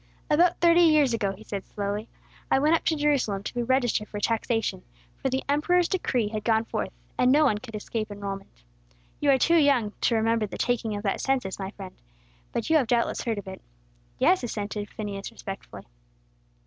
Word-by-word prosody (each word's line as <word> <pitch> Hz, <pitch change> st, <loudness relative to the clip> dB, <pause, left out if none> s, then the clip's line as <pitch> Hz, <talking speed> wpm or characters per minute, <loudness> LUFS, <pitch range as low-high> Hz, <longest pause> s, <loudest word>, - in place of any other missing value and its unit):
"About 340 Hz, +3 st, +4 dB
thirty 340 Hz, 0 st, +5 dB
years 305 Hz, -6 st, +5 dB
ago," 200 Hz, -4 st, 0 dB
he 210 Hz, -, -14 dB
said 200 Hz, -3 st, -5 dB
slowly, 205 Hz, +2 st, -4 dB, 0.4 s
"I -, -, +4 dB
went 300 Hz, +4 st, +3 dB
up 330 Hz, -, +2 dB
to 320 Hz, -, +2 dB
Jerusalem 280 Hz, -10 st, +1 dB
to -, -, -5 dB
be 245 Hz, -, -1 dB
registered 245 Hz, -3 st, +1 dB
for 205 Hz, -, -6 dB
taxation, 225 Hz, -3 st, -1 dB, 0.4 s
for 270 Hz, -, 0 dB
the 265 Hz, +1 st, -1 dB
emperor's 335 Hz, +5 st, +2 dB
decree 250 Hz, -, 0 dB
had 215 Hz, -1 st, -4 dB
gone 225 Hz, 0 st, +2 dB
forth -, -, -3 dB, 0.3 s
and 250 Hz, 0 st, +5 dB
no 300 Hz, +2 st, +5 dB
one 210 Hz, -7 st, +2 dB
could 225 Hz, -1 st, -9 dB
escape 215 Hz, +1 st, -4 dB
enrolment. 200 Hz, -1 st, -6 dB, 0.7 s
You 290 Hz, -, +1 dB
are 270 Hz, -, +6 dB
too 335 Hz, +6 st, +4 dB
young 275 Hz, -9 st, +3 dB
to 235 Hz, -, +2 dB
remember 225 Hz, -1 st, +1 dB
the -, -, -7 dB
taking 235 Hz, -3 st, 0 dB
of 205 Hz, -, -5 dB
that 195 Hz, -, -1 dB
census, 255 Hz, -9 st, -1 dB
my 190 Hz, -1 st, -4 dB
friend; 195 Hz, -2 st, -10 dB, 0.6 s
but 230 Hz, -, -2 dB
you 320 Hz, -, +5 dB
have 265 Hz, -6 st, +1 dB
doubtless 235 Hz, 0 st, +1 dB
heard 225 Hz, -3 st, -1 dB
of 200 Hz, -, -7 dB
it." 190 Hz, 0 st, -8 dB, 0.6 s
"Yes," 365 Hz, -2 st, +3 dB
assented 210 Hz, -3 st, -4 dB
Phineas, 200 Hz, -2 st, -6 dB
respectfully. 195 Hz, 0 st, -8 dB
230 Hz, 195 wpm, -26 LUFS, 205-280 Hz, 0.7 s, are